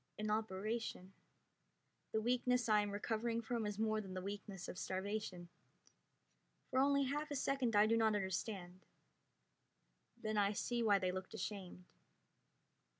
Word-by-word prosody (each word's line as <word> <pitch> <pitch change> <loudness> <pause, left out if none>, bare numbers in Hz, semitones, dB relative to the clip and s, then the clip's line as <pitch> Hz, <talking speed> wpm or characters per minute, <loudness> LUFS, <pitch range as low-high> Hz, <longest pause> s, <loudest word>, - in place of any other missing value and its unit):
An 215 0 -1
operation. 215 -2 -2 1.0
The 220 - +1
weakness 250 +1 +2
I 210 -1 +5
am 205 - -1
recovering 225 +3 -1
from 230 -1 -1
is 205 -1 -3
more 215 0 +1
than 190 -2 -7
the 185 - -2
weakness 200 -1 -5
of 180 - -6
starvation. 190 -2 -3 1.2
For 260 - +3
only 280 +1 +4
half 295 +3 -1
a 290 - -2
second 260 -4 +1
I 205 +1 +7
do 225 +1 +4
not 220 -2 +4
understand; 190 -1 -3 1.3
then 215 -1 -1
I 200 0 +3
see 240 +3 -1
why 210 -3 +5
they 185 -1 0
looked 185 +3 -5
ashamed. 190 -4 -5
215 Hz, 145 wpm, -39 LUFS, 195-230 Hz, 1.3 s, I